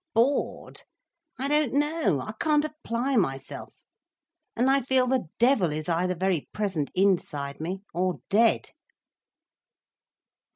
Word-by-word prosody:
"Bored, 250 +5 0 0.6
I 270 - -1
don't 295 -3 +2
know. 295 - +1
I 215 - -6
can't 300 -1 +2
apply 270 -4 -2
myself. 135 -9 -3 0.7
And 245 +3 +1
I 275 +1 +4
feel 260 0 +3
the 255 -7 0
devil 235 - +3
is 155 0 -4
either 180 +2 0
very 180 -3 -1
present 190 -9 -2
inside 160 -7 0
me, 185 +4 -4
or 180 +1 0
dead." 225 +3 +3
215 Hz, 120 wpm, -26 LUFS, 175-270 Hz, 0.7 s, I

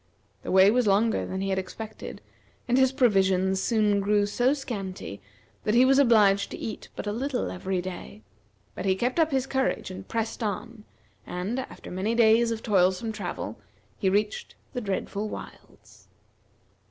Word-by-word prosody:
The - - -7
way 190 +2 +6
was 245 -1 +2
longer 215 +3 +2
than 190 0 -4
he 195 - -1
had 190 0 +1
expected, 220 +4 -8 0.5
and 245 - +2
his 260 0 +4
provisions 190 -6 +2
soon 210 -3 +2
grew 205 +1 +2
so 245 +5 +2
scanty 195 - -6 0.4
that 215 - +1
he 250 +2 +6
was 270 +1 +5
obliged 210 -6 +4
to - - -7
eat 220 - -6
but - - -5
a 205 - -1
little 255 +4 -2
every 185 0 -2
day, 175 - -8 0.5
but - - -6
he 190 -1 +3
kept 245 - -1
up 320 -1 +4
his 265 -3 0
courage, 265 -7 -1
and 185 +1 -9
pressed 225 +1 -3
on, 220 +1 -4 0.4
and, 190 +8 -3
after 260 - -8
many 195 +5 -1
days 230 0 +5
of 225 -1 -3
toilsome 190 +1 +2
travel, 175 - -5 0.4
he 190 - +2
reached 210 - -1 0.2
the 250 - -3
dreadful 205 +1 -3
wilds. - - -12
210 Hz, 165 wpm, -27 LUFS, 190-240 Hz, 0.5 s, way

